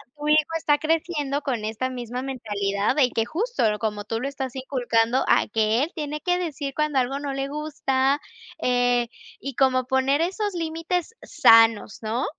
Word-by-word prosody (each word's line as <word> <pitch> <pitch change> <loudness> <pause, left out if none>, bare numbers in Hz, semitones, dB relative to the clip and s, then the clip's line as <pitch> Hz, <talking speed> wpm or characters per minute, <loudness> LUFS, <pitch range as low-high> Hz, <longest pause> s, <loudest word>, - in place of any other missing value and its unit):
tu 295 0 -5
hijo 305 0 +6 0.2
está 295 -2 +2
creciendo 310 -2 -1
con 245 -7 -2
esta 220 +4 -2
misma 245 0 -5
mentalidad 210 -5 -1
de 265 -4 +4
que 225 - 0
justo 440 - -2 0.2
como 210 -2 -3
tú 225 - -3
lo 270 - -2
estás 270 -2 -5
inculcando, 250 -2 +1
a - - +3
que 220 +4 +1
él 325 - -3
tiene 300 -1 -4
que 360 0 +1
decir 290 -5 -4
cuando 300 -3 +1
algo 270 +3 -1
no 285 -1 -4
le 275 0 -3
gusta, 285 -2 0 0.4
eh, 245 -1 +2 0.3
y 275 -2 -6
como 255 -2 +2
poner 265 +3 +2
esos 395 +4 -1
límites 335 +4 -3
sanos, 225 -3 +4
¿no? 225 +3 -1
270 Hz, 170 wpm, -24 LUFS, 240-300 Hz, 0.4 s, hijo